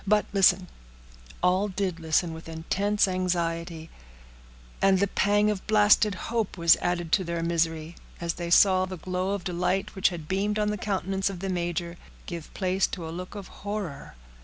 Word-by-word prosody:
But 210 +1 +3
listen—" 195 -1 +4 0.8
All 185 +3 +3
did 185 -3 -2
listen 165 +1 +1
with 160 0 -10
intense 195 +6 0
anxiety; 170 -3 -2 0.9
and 195 -1 +5
the 200 - +3
pang 205 +2 +2
of 200 -3 -5
blasted 210 -1 +4
hope 225 -1 -3
was 170 -1 +6
added 175 -2 -2
to 190 - +3
their 170 -1 -3
misery, 165 -1 -1 0.2
as 170 -1 -2
they 170 -1 -5
saw 185 +1 +5
the 185 0 -7
glow 185 +2 -2
of 200 - -6
delight 180 +2 -1
which 190 -1 +2
had 165 -4 -7
beamed 200 +3 0
on 210 0 +1
the 210 - -2
countenance 195 -1 -1
of 190 -3 -6
the 195 +1 -3
major 175 -1 -2 0.3
give 170 -3 -7
place 190 0 +1
to 170 -4 -6
a - - -6
look 180 +4 -7
of 200 -3 -7
horror. 200 - -5
185 Hz, 175 wpm, -27 LUFS, 170-195 Hz, 0.9 s, was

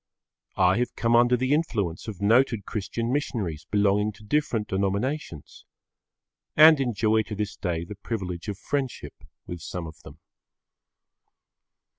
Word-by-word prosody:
I 95 +2 +4
have 125 -1 -2
come 115 0 +2
under 120 +1 +5
the 130 +3 +1
influence 110 - -1
of 105 -5 -6
noted 115 0 +3
Christian 115 +4 -3
missionaries 95 - -3
belonging 105 0 +2
to 105 - -17
different 115 -2 0
denominations. 100 - -3 0.9
And 155 0 +8
enjoy 110 -3 +2
to 105 0 -6
this 105 0 -3
day 85 -3 -3
the 105 - -8
privilege 95 -4 -5
of 100 -2 -4
friendship 135 +3 -3 0.3
with 85 -1 -7
some 90 +2 -5
of 80 -2 -11
them. - - -13
105 Hz, 135 wpm, -26 LUFS, 95-125 Hz, 0.9 s, And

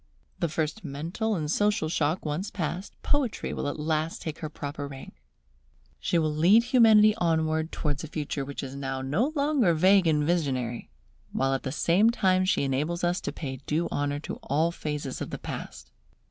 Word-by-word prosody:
The 170 - 0
first 160 +7 -2
mental 170 +9 -2
and 155 -4 -2
social 205 -1 +2
shock 155 +2 0
once 160 +7 -2
passed, 180 +1 -4
Poetry 280 -6 0
will - - -3
at 145 - -3
last 155 +1 -1
take 160 -1 -5
her 155 - -4
proper 145 -1 -5
rank. 135 -1 -11 0.8
She 175 - 0
will 155 -2 +1
lead 185 +9 +5
Humanity 225 -4 +6
onward 160 -1 +1
towards 145 -2 -2
a - - -5
future 150 -2 -3
which 140 +1 -6
is 135 0 -6
now 135 -1 -3
no 185 - +1
longer 280 - +3
vague 185 +2 +5
and 150 -2 +3
visionary, 135 -8 -1 0.4
while 135 0 +1
at 135 - -1
the 130 - -4
same 175 +9 +3
time 185 -5 +2
she 185 - +2
enables 150 +6 -1
us 175 +1 +1
to - - -3
pay 135 -4 -5
due 165 +3 0
honour 145 0 -1
to - - -6
all 155 +5 0
phases 150 -5 -4
of - - -3
the - - -5
past. - - -7
160 Hz, 185 wpm, -27 LUFS, 145-185 Hz, 0.8 s, Humanity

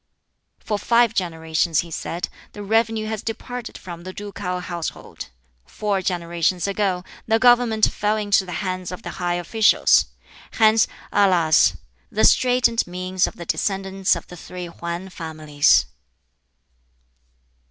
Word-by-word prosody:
"For 210 -2 -3
five 235 0 +3
generations," 160 -3 0
he 170 - -11
said, 170 +2 -4 0.3
"the 205 - -8
revenue 225 +1 +1
has 215 -1 -4
departed 240 +1 -6
from 175 -2 -9
the 185 +2 -7
ducal 200 -3 -5
household. 170 - -6 0.4
Four 205 - -2
generations 175 -1 -1
ago 195 -3 -1 0.2
the 225 0 +3
government 240 -2 +4
fell 210 +1 0
into 205 -2 +2
the 180 - -9
hands 185 -1 -3
of 180 - -8
the - - -7
high 175 0 0
officials. 210 +5 +3 0.5
Hence, 220 0 +4 0.2
alas! 175 -6 +4 0.3
the - - +2
straitened 250 -4 +3
means 185 +1 -1
of - - -8
the 170 - -8
descendants 195 -1 0
of 170 - -7
the 180 - -12
three 180 +2 -8
Hwan 170 +2 -6
families." 155 -4 +2
185 Hz, 130 wpm, -22 LUFS, 175-215 Hz, 0.5 s, government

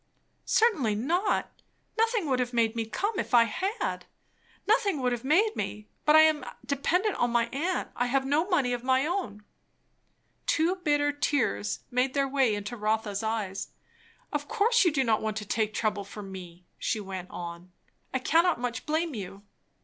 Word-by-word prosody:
"Certainly 320 - +3
not. 335 - -1 0.3
Nothing 450 -4 +1
would 260 -2 +1
have 245 0 -1
made 230 -1 +2
me 225 -1 -2
come, 405 - -2
if - - 0
I 235 - +8
had. 380 - -3 0.6
Nothing 410 - +2
would 250 -1 +1
have 240 0 -3
made 390 +11 +3
me! 210 0 -5 0.2
But 300 - +6
I 315 - +9
am 310 -3 +4 0.2
dependent 360 +9 0
on 240 - +2
my 235 0 +2
aunt. 335 +8 -2
I 245 - 0
have 265 +2 +1
no 305 +7 +1
money 275 -9 +2
of 240 0 -3
my 260 +1 +2
own." 300 - -3 1.0
Two 335 +4 +2
bitter 290 -4 +1
tears 115 - 0
made 255 +2 +1
their 275 -1 +2
way 265 -5 +2
into 205 +3 -5
Rotha's 215 -2 -1
eyes. 220 -3 -2 0.7
"Of 295 0 -2
course 465 0 +3
you 345 - +4
do 275 -2 +1
not 225 -3 +2
want 215 -1 -2
to 210 - -4
take 215 +1 0
trouble 215 -2 -1
for 205 +1 -9
me," 180 -2 -10
she 220 - -1
went 190 -3 -6
on. 175 +1 -8 0.4
"I - - 0
cannot 330 +4 +3
much 245 +2 -4
blame 315 +1 0
you." 195 -2 -7
255 Hz, 175 wpm, -28 LUFS, 215-320 Hz, 1.0 s, I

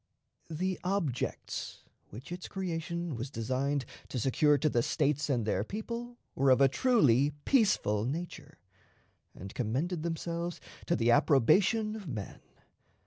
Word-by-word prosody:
The 185 +4 -2
objects 180 -9 -3 0.3
which 125 +10 -10
its 180 +1 -6
creation 170 -3 -3
was 120 +4 -5
designed 130 +3 -1 0.2
to - - -5
secure 145 +5 +3
to 155 - +1
the 120 -5 +2
States 145 +2 0
and 120 -5 +1
their 100 -2 0
people 235 - -6 0.2
were 135 +1 +2
of 130 - +6
a 135 - +7
truly 145 - +3
peaceful 195 - +3
nature, 165 +7 -5 0.8
and 95 +2 -9
commended 140 +9 -1
themselves 170 +1 -3 0.3
to 170 - +2
the 120 -5 +2
approbation 175 - +3
of 210 -5 -8
men. 110 -8 -6
150 Hz, 135 wpm, -31 LUFS, 130-180 Hz, 0.8 s, a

